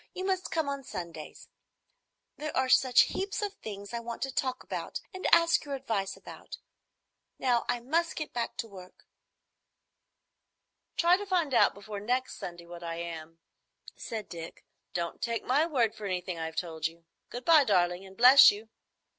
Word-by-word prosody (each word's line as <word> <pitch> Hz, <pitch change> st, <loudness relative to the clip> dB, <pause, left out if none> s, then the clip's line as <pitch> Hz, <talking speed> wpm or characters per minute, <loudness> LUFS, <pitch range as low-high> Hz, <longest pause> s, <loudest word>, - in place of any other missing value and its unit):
You 370 Hz, -, -4 dB
must 375 Hz, -1 st, -1 dB
come 320 Hz, -3 st, -1 dB
on 280 Hz, -1 st, -3 dB
Sundays. 170 Hz, -9 st, -8 dB, 0.9 s
There 305 Hz, 0 st, -5 dB
are 260 Hz, 0 st, +2 dB
such 255 Hz, -1 st, +6 dB
heaps 395 Hz, +2 st, -2 dB
of 410 Hz, -1 st, -2 dB
things 200 Hz, -, -8 dB
I 235 Hz, -, -2 dB
want 235 Hz, 0 st, -5 dB
to 270 Hz, -1 st, -3 dB
talk 255 Hz, -1 st, -2 dB
about -, -, -5 dB
and 375 Hz, -, -3 dB
ask 335 Hz, 0 st, +5 dB
your 285 Hz, -1 st, -4 dB
advice 220 Hz, -8 st, -3 dB
about. -, -, -10 dB, 0.8 s
Now 245 Hz, -2 st, +1 dB
I 240 Hz, -, 0 dB
must 330 Hz, +7 st, 0 dB
get 305 Hz, -, -5 dB
back 235 Hz, -1 st, -3 dB
to 230 Hz, -, -3 dB
work." 185 Hz, -3 st, -14 dB, 1.9 s
"Try 345 Hz, +1 st, +5 dB
to 410 Hz, -, -6 dB
find 345 Hz, -7 st, +1 dB
out -, -, +4 dB
before 205 Hz, 0 st, -7 dB
next 250 Hz, +5 st, -1 dB
Sunday 175 Hz, -1 st, -8 dB
what 175 Hz, 0 st, -10 dB
I 165 Hz, 0 st, -4 dB
am," 165 Hz, -1 st, -7 dB, 0.6 s
said 220 Hz, -2 st, -6 dB
Dick. 165 Hz, -1 st, -9 dB, 0.3 s
"Don't 170 Hz, -1 st, -3 dB
take 230 Hz, -1 st, -2 dB
my 290 Hz, +6 st, +2 dB
word 240 Hz, -9 st, +1 dB
for 210 Hz, -, -6 dB
anything 180 Hz, -2 st, -3 dB
I've 160 Hz, 0 st, -4 dB
told 160 Hz, -2 st, -2 dB
you. 165 Hz, 0 st, -16 dB, 0.2 s
Good 245 Hz, +1 st, -7 dB
bye, 320 Hz, -3 st, +7 dB
darling, 180 Hz, -5 st, +2 dB
and 190 Hz, 0 st, -14 dB
bless 255 Hz, +3 st, +10 dB
you." 215 Hz, +2 st, -4 dB
230 Hz, 170 wpm, -29 LUFS, 180-280 Hz, 1.9 s, bless